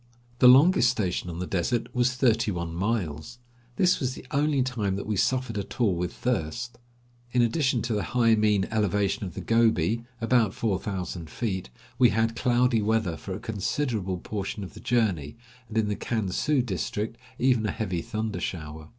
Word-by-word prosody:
The 125 - +7
longest 135 +1 +7
station 95 -7 -1
on 85 - -6
the 90 - -3
desert 95 +7 -1
was 125 0 +1
thirty 120 -3 +2
one 85 -3 -3
miles. 95 +1 -2 0.4
This 180 +4 +3
was 130 -1 -2
the - - -11
only 145 -2 +2
time 110 -7 -1
that 100 - -4
we 105 - -1
suffered 125 +1 0
at 100 - -7
all 110 -6 +3
with 90 +1 -2
thirst. 120 +2 -3 0.5
In 125 -1 +4
addition 130 0 +1
to 120 - -1
the 105 - 0
high 115 0 +2
mean 105 -3 +3
elevation 105 0 0
of 90 - -7
the - - -4
Gobi, 115 -2 +2 0.2
about 115 -3 +2
four 100 -5 0
thousand 90 -5 -5
feet, 95 - -3 0.3
we 125 -2 +7
had 110 +2 +1
cloudy 120 -1 +2
weather 105 -5 +1
for 95 +3 -6
a - - -6
considerable 105 -2 -2
portion 100 +2 -5
of 95 - -9
the - - -11
journey, 100 - 0 0.3
and, 115 - -4
in 110 -1 +2
the 105 - -1
Kan 110 -4 -2
su 140 +6 +1
district, 110 +1 -3 0.2
even 125 -4 +2
a - - 0
heavy 95 -7 -2
thunder 110 -3 -3
shower. 80 -3 -6
110 Hz, 185 wpm, -27 LUFS, 95-120 Hz, 0.5 s, The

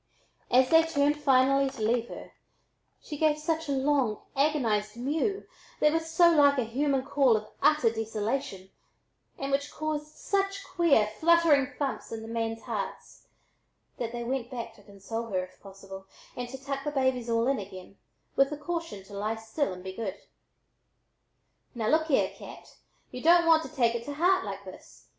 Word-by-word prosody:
As 255 +1 +5
they 325 0 +8
turned 295 -2 +1
finally 275 0 +4
to 250 - -10
leave 235 +1 +1
her - - -9 0.7
she 295 -2 -7
gave 310 -1 +3
a 320 -2 -1
long 270 -5 +1
agonized 235 -7 +1
mew 320 - -1 0.3
that 300 0 +4
was 325 0 -1
so 340 +1 +5
like 285 -3 +5
a 255 - +2
human 265 +3 0
call 265 -6 +3
of 215 0 -8
utter 300 -7 +4
desolation, 220 -3 -3 0.7
and 275 0 -4
which 280 +1 -1
caused 305 -1 -3
such 395 0 -1
queer 325 - +3
fluttering 300 +3 +3
thumps 280 -2 -3
in 225 -1 -5
the - - -8
men's 225 0 -3
hearts, - - -6 0.7
that 230 -2 -3
they 240 0 -5
went 245 0 -3
back 235 -3 -6
to 210 - -19
console 205 +3 -6
her, 185 -4 -1
if 185 - -14
possible, 195 -1 -11 0.3
and 245 -1 -5
to 265 - -7
tuck 275 0 -5
the 295 - -1
babies 260 -4 0
all 230 0 +2
in 275 -2 +1
again, 190 -1 -10 0.4
with 275 0 +4
the 300 - -5
caution 330 - -5
to 200 - -15
lie 210 +3 -2
still 225 +5 -2
and 180 0 -8
be 190 0 -6
good. 200 -2 -4 1.6
"Now 225 -2 -1
look 315 +1 +2
here, 280 - +2
Cat, - - -12 0.4
y'u 250 - -7
don't 340 +1 +5
want 325 -1 +5
to - - -7
take 240 -6 +1
it 235 0 -4
to 290 - -5
heart 360 +2 +2
like 200 -1 -6
this! 185 - -14
265 Hz, 175 wpm, -28 LUFS, 225-300 Hz, 1.6 s, they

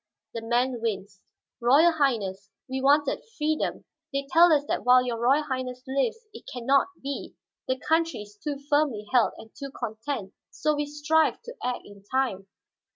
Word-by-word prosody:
The 230 - -4
man 240 +1 0
winced. 195 -3 -3 0.4
"Royal 285 +8 +6
Highness, 215 - 0 0.2
we 260 0 -3
wanted 285 +1 +3 0.2
freedom. 305 0 -1 0.3
They 275 0 -2
tell 340 +1 +7
us 290 -2 +3
that - - -2
while 250 0 +6
your 235 -2 -2
Royal 275 +5 +4
Highness 255 -3 -4
lives 275 - -1
it - - -11
can 245 -2 -6
not 275 +1 +4 0.2
be; 280 0 -5 0.3
the 260 - 0
country 325 -4 0
is 205 0 -16
too 285 +7 -4
firmly 290 -8 +1
held 245 -3 +4
and 220 - -12
too 275 -1 -6
content. 220 -3 -5 0.2
So 305 +1 0
we 295 0 -1
strive 300 +2 +2
to - - -8
act 250 0 -2
in 205 -1 -14
time." 245 -8 0
265 Hz, 170 wpm, -27 LUFS, 230-295 Hz, 0.4 s, tell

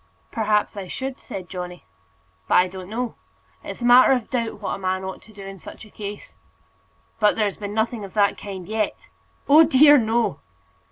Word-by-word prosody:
"Perhaps 215 -3 0
I 195 -2 -6
should," 265 +6 -5
said 185 -2 -8
Johnny; 180 -1 -7 0.6
"but - - +2
I 180 - +5
don't 185 0 -9
know. 235 +2 -3 0.5
It's - - -7
a - - 0
matter 245 +2 +7
of 250 -4 -2
doubt 230 -4 -2
what 200 - -3
a - - -5
man 185 0 -2
ought 190 0 -6
to 220 - -18
do 200 -2 -11
in 195 0 -9
such 220 - -11
a 215 - -18
case." 205 -1 -8 0.8
"But 210 -1 +4
there's 210 -3 -1
been 205 0 -6
nothing 220 0 -1
of 195 0 -10
that 205 -1 +3
kind 190 -3 -8
yet?" 215 -1 -3 0.4
"Oh 305 +3 +8
dear, 290 0 +6
no!" 225 - 0
210 Hz, 190 wpm, -23 LUFS, 195-235 Hz, 0.8 s, Oh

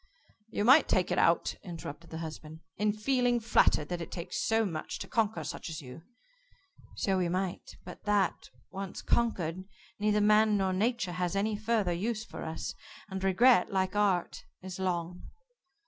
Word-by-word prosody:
"You 210 - -1
might 270 +5 +7
take 185 -1 +1
it 180 - +2
out," 170 0 +3
interrupted 170 -2 -8
the 160 - -6
husband, 160 -1 -8
"in 210 0 +1
feeling 245 +2 +1
flattered 185 -9 +3
that 175 -1 -3
it 165 - -6
takes 170 -2 -4
so 225 0 +2
much 160 -5 -4
to - - -7
conquer 220 -8 0
such 150 - -6
as 155 - -5
you." 130 +2 -10 0.9
"So 190 -2 0
we 175 -2 0
might, 185 +1 -3
but 180 - -11
that, 205 -4 +1 0.2
once 195 -1 -6
conquered, 185 -7 0 0.4
neither 210 0 +2
man 210 0 +4
nor 190 -1 +1
Nature 215 -1 0
has 180 +1 -2
any 210 +2 0
further 215 -4 0
use 215 +5 -2
for - - -9
us, 160 0 -4 0.4
and 190 0 -5
regret, 195 +2 +4
like 190 0 0
art, 195 -4 +1 0.2
is 190 0 -7
long. 175 -1 -2
190 Hz, 165 wpm, -30 LUFS, 175-215 Hz, 0.9 s, might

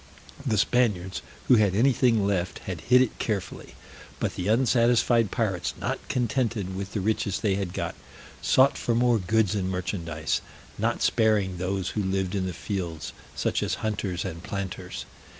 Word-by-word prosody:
The 115 -6 +1
Spaniards 100 -5 +1 0.3
who 125 - +7
had 100 -3 +3
anything 120 -2 +3
left 90 -3 0
had 90 -4 -4
hid 125 +8 +5
it 125 - -5
carefully; 105 -4 -3 0.4
but - - -1
the 90 - -3
unsatisfied 115 -1 +3
pirates, 95 -7 -1
not - - -2
contented 115 -6 0
with 100 +1 -5
the 105 - -1
riches 100 -1 0
they 105 -3 +2
had 95 -2 -2
got, - - -3 0.5
sought 135 +2 +4
for 120 - 0
more 120 -1 +3
goods 105 +2 +2
and 95 -3 -1
merchandise, 85 -4 -2 0.4
not - - 0
sparing 105 -5 +2
those 95 0 -1
who 105 - -2
lived 95 -1 -1
in 95 -2 -1
the - - -2
fields, 85 -4 -4 0.2
such - - 0
as - - 0
hunters 100 -4 -2
and 85 +1 -5
planters. 100 -1 -5
100 Hz, 160 wpm, -26 LUFS, 95-115 Hz, 0.5 s, who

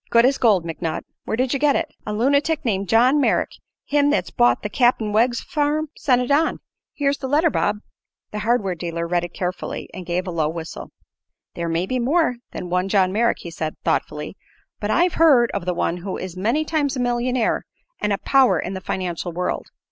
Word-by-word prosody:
Good 235 0 +5
as 270 +1 +2
gold, 205 -8 +3
McNutt. 165 0 -3 0.2
Where 220 - -2
did 255 +1 +1
you 275 - 0
get 290 0 +3
it?" 325 -2 -2
"A - - -2
lunitic 280 +8 +1
named 200 -4 -1
John 255 +6 +4
Merrick, - - +1 0.3
him 290 0 +2
that's 300 - 0
bought 120 0 +3
the - - -1
Cap'n 225 -1 +2
Wegg 240 +3 +3
farm, 300 +4 -1
sent 250 -3 +2
it 250 - -3
on. 310 +3 +3 0.4
Here's 280 -1 0
his 265 - -3
letter, 310 +3 +3
Bob." 210 0 0 0.5
The 210 - -4
hardware 210 -3 +1
dealer 170 0 -4
read 175 0 0
it 175 - -7
carefully 180 0 -4
and 185 - -7
gave 175 +1 -2
a 180 - -4
low 160 -3 0
whistle. 160 0 -7 0.6
"There 170 -1 -3
may 165 +2 0
be 255 +6 -2
more 270 +1 +2
than 180 - -6
one 180 +1 0
John 190 -2 +3
Merrick," 230 +4 +2
he 170 - -7
said, 160 -1 -4
thoughtfully. 150 +4 -2 0.4
"But 205 - -3
I've 350 +8 +3
heard 265 -8 +6
of 190 -3 -4
one 175 -1 0
who 185 +2 -5
is 185 -2 -6
many 230 +12 0
times 290 -4 0
a - - -2
millionaire 245 0 0 0.3
and 210 - 0
a 200 - +1
power 255 -7 +3
in 190 - -4
the 190 - -5
financial 180 -2 -3
world. 180 +2 -3
220 Hz, 205 wpm, -22 LUFS, 180-270 Hz, 0.6 s, heard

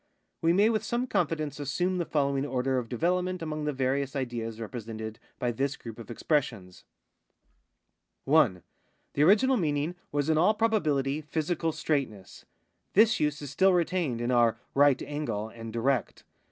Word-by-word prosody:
We 165 - +3
may 205 +6 +4
with 215 -2 0
some 240 +3 -1
confidence 160 - -1
assume 175 +6 -1
the 170 - -2
following 140 -2 +1
order 130 -1 0
of 115 -2 -7
development 180 +6 0
among 155 -1 -3
the 150 - 0
various 135 +1 -1
ideas 120 -4 -3
I'epresented 110 -1 -6 0.2
by 120 - -1
this 135 +3 -1
group 115 -1 -9
of 115 - -10
expressions: 115 - -2 0.7
— - - -50
1. 135 - +3 0.5
The 140 - 0
original 225 - +5
meaning 150 -2 0 0.2
was 145 0 0
in 160 -1 +3
all 210 +6 +4
])robalnlity 155 -11 +1
physical 160 +2 -1
straightness. 135 -12 -3 0.5
This 220 +2 +5
use 150 0 -1
is 145 - -6
still 190 0 +4
retained 170 -8 0
in 120 +1 0
our 120 -2 +3 0.2
right 140 -1 +5
angle 115 -8 -3
and 115 0 -9
direct. 120 0 -1
145 Hz, 155 wpm, -28 LUFS, 120-165 Hz, 0.7 s, original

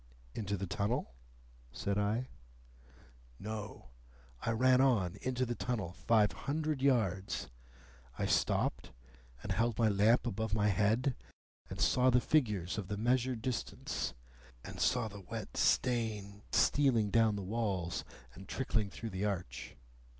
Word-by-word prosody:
"Into 100 -2 -2
the 95 - -3
tunnel?" 100 - -1 0.6
said 100 +10 -1
I. 110 +5 0 1.1
"No. 105 -2 -7 0.5
I - - -2
ran 130 +3 +4
on 110 -10 +2
into 130 0 0
the 120 - -2
tunnel, 115 -8 -3
five 105 +2 +3
hundred 150 -1 -2
yards. 100 - +1 0.7
I - - 0
stopped, - - +1 0.5
and 100 - -4
held 115 +3 +1
my 115 -2 +4
lamp 105 +5 +4
above 110 -2 -1
my 105 -1 +3
head, 110 +6 +2 0.5
and 95 - -7
saw 90 +10 +4
the 125 0 +5
figures 105 - +1
of 100 - -5
the 105 - -3
measured 120 +1 +1
distance, 130 -2 -3 0.5
and - - -8
saw 125 -3 +2
the 105 -2 -9
wet 90 - -7
stains 110 -5 +1
stealing 120 -8 +3
down 110 -1 +4
the 100 - -4
walls 95 -4 -2 0.3
and 95 +8 -12
trickling 110 -6 -1
through 115 +2 -6
the 95 +2 -2
arch. 90 -12 -4
110 Hz, 135 wpm, -34 LUFS, 100-125 Hz, 1.1 s, the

